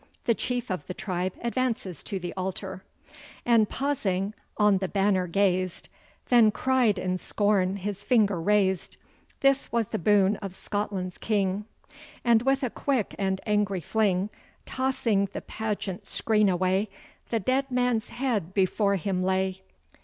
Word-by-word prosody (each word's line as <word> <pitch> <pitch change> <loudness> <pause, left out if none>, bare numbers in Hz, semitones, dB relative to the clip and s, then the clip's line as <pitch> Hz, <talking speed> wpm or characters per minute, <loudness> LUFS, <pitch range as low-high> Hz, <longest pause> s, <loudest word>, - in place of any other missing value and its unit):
The 235 - +4
Chief 245 0 -2
of 180 -6 -4
the 180 - -5
tribe 185 -1 -2
advances 235 - -1
to 200 - -3
the 175 -1 -5
altar: 190 0 -4 0.6
And 230 -3 +4
pausing, 210 -8 -1 0.2
on 210 -2 +4
the 190 - -1
banner 195 -2 +1
gazed; 185 -1 0 0.4
Then 235 -3 +6
cried 245 -2 +2
in 185 0 -1
scorn, 200 -2 +1
his 200 0 -4
finger 205 -7 +3
raised, 190 0 +1 0.4
"This 275 0 +2
was 235 -1 +1
the - - -2
boon 205 +2 +3
of 195 -2 -7
Scotland's 200 -4 -3
king;" 200 -1 0 0.6
And, 235 -2 +5
with 270 +2 +1
a 250 - 0
quick 265 -7 -1
and 190 -1 0
angry 205 -3 +1
fling, 200 +1 0 0.3
Tossing 230 -7 0
the - - -4
pageant 210 -4 -4
screen 215 -2 +2
away, 190 +3 +1 0.4
The 230 - +1
dead 265 +6 0
man's 245 -3 0
head 220 -9 -2
before 200 +1 +2
him 185 0 -1
lay. 190 0 0
205 Hz, 145 wpm, -27 LUFS, 190-225 Hz, 0.6 s, Then